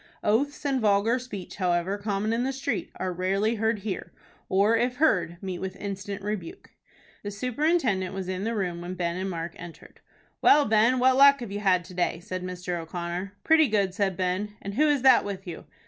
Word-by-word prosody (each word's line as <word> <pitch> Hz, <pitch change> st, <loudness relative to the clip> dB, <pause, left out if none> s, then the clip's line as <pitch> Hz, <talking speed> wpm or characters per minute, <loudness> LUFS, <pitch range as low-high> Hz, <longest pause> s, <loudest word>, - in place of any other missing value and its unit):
Oaths 280 Hz, +8 st, 0 dB
and 270 Hz, -3 st, +1 dB
vulgar 215 Hz, +4 st, +3 dB
speech, 210 Hz, -7 st, -8 dB
however 180 Hz, +1 st, 0 dB
common 205 Hz, +1 st, -1 dB
in 235 Hz, +2 st, 0 dB
the 265 Hz, -, 0 dB
street, 270 Hz, +1 st, -3 dB
are 185 Hz, -1 st, -3 dB
rarely 195 Hz, +5 st, 0 dB
heard 220 Hz, -2 st, +1 dB
here, 195 Hz, -4 st, -4 dB, 0.4 s
or, 200 Hz, +4 st, +3 dB
if 245 Hz, +2 st, 0 dB
heard, 180 Hz, -, +2 dB
meet 185 Hz, -2 st, -4 dB
with 190 Hz, 0 st, -5 dB
instant 200 Hz, 0 st, -6 dB
rebuke. 215 Hz, -, -5 dB, 0.5 s
The 205 Hz, -, -5 dB
superintendent 250 Hz, -, 0 dB
was 190 Hz, -2 st, -4 dB
in 185 Hz, +1 st, -3 dB
the 230 Hz, +2 st, -1 dB
room 180 Hz, -4 st, -2 dB
when 180 Hz, +1 st, -5 dB
Ben 170 Hz, -1 st, -2 dB
and 190 Hz, +1 st, -3 dB
Mark 170 Hz, -1 st, -4 dB
entered. 170 Hz, -1 st, -12 dB, 0.4 s
"Well, 290 Hz, -1 st, +6 dB
Ben, 220 Hz, +4 st, +3 dB
what 255 Hz, +1 st, +4 dB
luck 280 Hz, 0 st, +7 dB
have 230 Hz, -5 st, -6 dB
you 205 Hz, -, -3 dB
had 185 Hz, -3 st, +2 dB
to 185 Hz, -, -12 dB
day?" 175 Hz, -2 st, -1 dB
said 185 Hz, +1 st, -6 dB
Mr. 180 Hz, -1 st, -4 dB
O'Connor. 175 Hz, +3 st, -5 dB
"Pretty 320 Hz, -1 st, +5 dB
good," 200 Hz, -4 st, +1 dB
said 195 Hz, -2 st, -1 dB
Ben. 190 Hz, +3 st, -2 dB
"And 200 Hz, -, -6 dB
who 300 Hz, +8 st, +3 dB
is 290 Hz, -4 st, +2 dB
that 260 Hz, -2 st, +7 dB
with 195 Hz, -1 st, -6 dB
you?" 175 Hz, -3 st, -8 dB
200 Hz, 200 wpm, -26 LUFS, 185-235 Hz, 0.5 s, luck